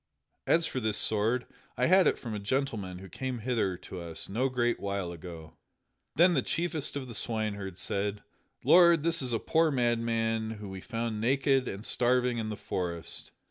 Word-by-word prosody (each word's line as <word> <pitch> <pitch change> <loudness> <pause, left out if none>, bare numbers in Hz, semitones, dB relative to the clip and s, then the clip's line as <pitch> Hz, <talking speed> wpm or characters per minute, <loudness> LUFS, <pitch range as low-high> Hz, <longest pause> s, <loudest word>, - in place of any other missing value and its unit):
As 165 0 +4
for 130 - -2
this 110 -3 0
sword, 110 +4 +1 0.3
I 125 - +2
had 185 +1 +6
it - - +2
from 115 -3 -6
a 105 - -3
gentleman 105 -4 -2
who 95 +1 -10
came 130 +6 -4
hither 110 -6 -1
to 90 - -9
us 85 -1 -3
no 125 +7 0
great 120 -2 0
while 100 -3 -3
ago." 80 -2 -9 0.6
Then 175 +5 +6
the 135 - +2
chiefest 165 0 -2
of 135 -2 -4
the 120 - -8
swineherds 105 -5 -3
said: 100 +2 -2 0.4
"Lord, 170 -3 +6
this 165 -1 +2
is 130 -2 -1
a 115 - +2
poor 160 +6 +2
madman 115 -3 0
whom 100 -2 -7
we 95 -1 -7
found 115 -1 -3
naked 135 +1 +2
and 100 +3 -5
starving 125 -1 +2
in 110 -1 -3
the 105 - -4
forest. 85 -4 -3
115 Hz, 180 wpm, -30 LUFS, 100-130 Hz, 0.6 s, had